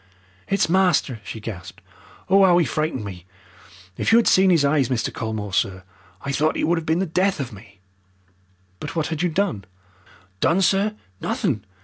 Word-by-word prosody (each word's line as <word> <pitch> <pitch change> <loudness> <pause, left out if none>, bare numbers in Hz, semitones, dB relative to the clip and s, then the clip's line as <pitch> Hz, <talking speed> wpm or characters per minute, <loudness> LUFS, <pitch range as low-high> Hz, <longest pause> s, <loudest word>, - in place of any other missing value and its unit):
"It's 195 -1 +1
master!" 175 -9 +2
she 105 +3 -7
gasped. 100 -3 -8 0.5
"Oh, 195 +1 +5
'ow 180 -2 +5
'e 170 - +2
frightened 155 -4 -2
me! 90 -2 -9 0.7
If - - 0
you 225 - +7
had 235 - +4
seen 190 0 +5
'is 165 -5 +4
eyes, 140 -3 +2
Mr. 125 -3 -1
Colmore, 110 -3 -4
sir. 95 -1 0 0.4
I 140 - -2
thought 155 +3 +1
'e - - -1
would 170 +1 +2
'ave 160 - -9
been 160 +1 +1
the 190 - 0
death 185 +2 0
of 130 -4 -4
me." 100 -1 -15 1.0
"But - - -6
what 160 -2 -1
had 160 -1 -3
you 180 - +1
done?" 170 - -1 0.8
"Done, 180 - +2
sir! 200 +3 +2 0.2
Nothing. 195 - -1
155 Hz, 180 wpm, -22 LUFS, 110-185 Hz, 1.0 s, you